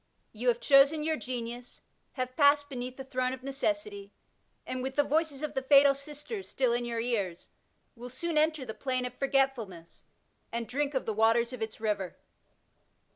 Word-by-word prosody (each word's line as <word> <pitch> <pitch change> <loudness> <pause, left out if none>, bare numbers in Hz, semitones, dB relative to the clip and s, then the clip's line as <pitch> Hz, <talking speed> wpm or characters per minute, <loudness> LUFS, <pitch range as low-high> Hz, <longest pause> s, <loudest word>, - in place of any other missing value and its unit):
Tou 230 +3 -4
have 240 -1 +3
chosen 285 +3 +5
your 315 0 +1
Genius, 245 -3 -6 0.3
have 255 -1 -4
passed 285 -1 +4
beneath 255 -1 -5
the 265 - -6
Throne 255 -1 -1
of 260 -1 -8
Necessity, 310 +9 -2 0.5
and 255 - -3
with 265 +1 -4
the 290 - +4
voices 305 -1 0
of 305 - -3
the 265 - -1
htal 275 +1 +6
sisters 295 - -7
still 255 -3 +1
in 240 0 0
your 235 -1 -2
ears, 205 -7 -2 0.5
will 245 +1 -8
soon 320 +6 -3
enter 305 -2 +2
the 220 - -5
plain 255 0 -2
of 250 - -5
Forgetfulness 255 - -1 0.5
and 235 0 -3
drink 280 +2 -1
of 260 - 0
the 220 - -1
waters 230 +3 +3
of 250 - -7
its 220 0 -4
river. 205 -4 -2
260 Hz, 180 wpm, -30 LUFS, 235-285 Hz, 0.5 s, htal